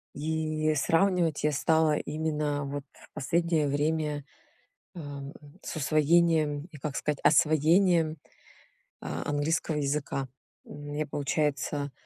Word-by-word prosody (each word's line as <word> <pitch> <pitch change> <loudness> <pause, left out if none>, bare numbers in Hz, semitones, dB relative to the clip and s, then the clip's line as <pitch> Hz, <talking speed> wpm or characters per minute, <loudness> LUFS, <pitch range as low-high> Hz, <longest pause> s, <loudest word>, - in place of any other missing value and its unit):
И 155 0 -1
сравнивать 165 +1 +2
я 150 - +3
стала 155 +1 +2
именно, 150 -1 -2
вот, 140 0 -5
в - - -19
последнее 165 +1 +1
время, 150 +1 -1 0.7
а, 145 -4 -7 0.4
с - - -6
усвоением 155 0 +2
и, 155 - -11
как 140 0 -4
сказать, 150 -2 -1
освоением 160 +1 +4 0.8
а - - -5
английского 150 +2 0
языка. 140 -1 -1 0.4
Мне, 145 +1 -5
получается, 145 0 -1
150 Hz, 105 wpm, -28 LUFS, 145-160 Hz, 0.8 s, освоением